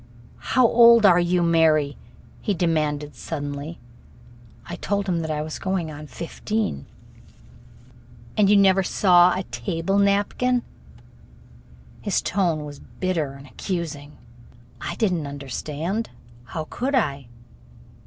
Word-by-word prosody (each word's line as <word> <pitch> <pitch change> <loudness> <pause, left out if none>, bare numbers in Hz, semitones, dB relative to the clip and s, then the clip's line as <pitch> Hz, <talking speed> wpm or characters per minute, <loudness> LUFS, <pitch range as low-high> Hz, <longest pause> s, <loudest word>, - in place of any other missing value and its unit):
"How 255 - +7
old 235 -1 +7
are 180 -3 +6
you, 175 0 +2
Mary?" 160 -4 +3 0.5
he 205 - -1
demanded 150 -4 -1
suddenly. 145 +1 -5 0.9
I - - -6
told 200 0 -2
him 175 -2 0
that 160 -1 -4
I 150 -1 -1
was 155 0 -6
going 185 -4 -2
on 150 0 -9
fifteen. 170 - -3 1.5
"And 205 -2 +4
you 205 - +6
never 195 -1 +5
saw 180 -1 +4
a 190 - -2
table 165 +10 -2
napkin?" 205 +5 +1 1.4
His 205 -3 0
tone 170 -6 0
was 145 -1 -9
bitter 165 -7 -3
and 140 0 -12
accusing. 150 -2 -5 0.6
I - - -4
did 215 -5 +1
n't 160 -4 -2
understand 150 - -4 0.4
how 155 +5 -5
could 270 +3 -1
I? 140 - 0
170 Hz, 125 wpm, -23 LUFS, 150-200 Hz, 1.5 s, How